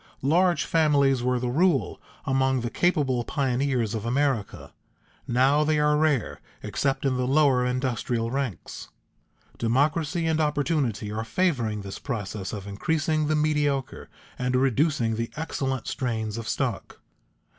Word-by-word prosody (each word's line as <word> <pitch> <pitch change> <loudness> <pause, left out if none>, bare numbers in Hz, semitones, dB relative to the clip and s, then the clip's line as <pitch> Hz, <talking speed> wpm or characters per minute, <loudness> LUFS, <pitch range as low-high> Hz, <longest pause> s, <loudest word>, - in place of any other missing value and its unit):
Large 170 +1 +3
families 140 -5 +3
were 125 +1 +1
the 125 - -2
rule 145 - +1 0.2
among 130 -1 +1
the 120 0 -3
capable 145 -9 +1
pioneers 130 -4 0
of 110 -2 -3
America; 125 -3 -1 0.5
now 135 +5 +3
they 155 0 +1
are 150 0 +3
rare 150 -5 0 0.2
except 135 0 -1
in 130 -2 +1
the 125 0 -1
lower 135 -2 +3
industrial 125 -2 -1
ranks. 135 - -4 0.7
Democracy 150 +8 +1
and 160 -1 +1
opportunity 145 -8 0
are 110 +1 -3
favoring 115 - 0
this 100 0 -7
process 105 -6 -4
of 100 -3 -6
increasing 155 +9 -1
the 155 - +1
mediocre 150 -3 -1 0.3
and 125 0 0
reducing 130 -2 +1
the 115 0 -2
excellent 135 -5 -3
strains 110 -5 -3
of 115 -1 -6
stock. - - -3
135 Hz, 135 wpm, -26 LUFS, 120-150 Hz, 0.7 s, Large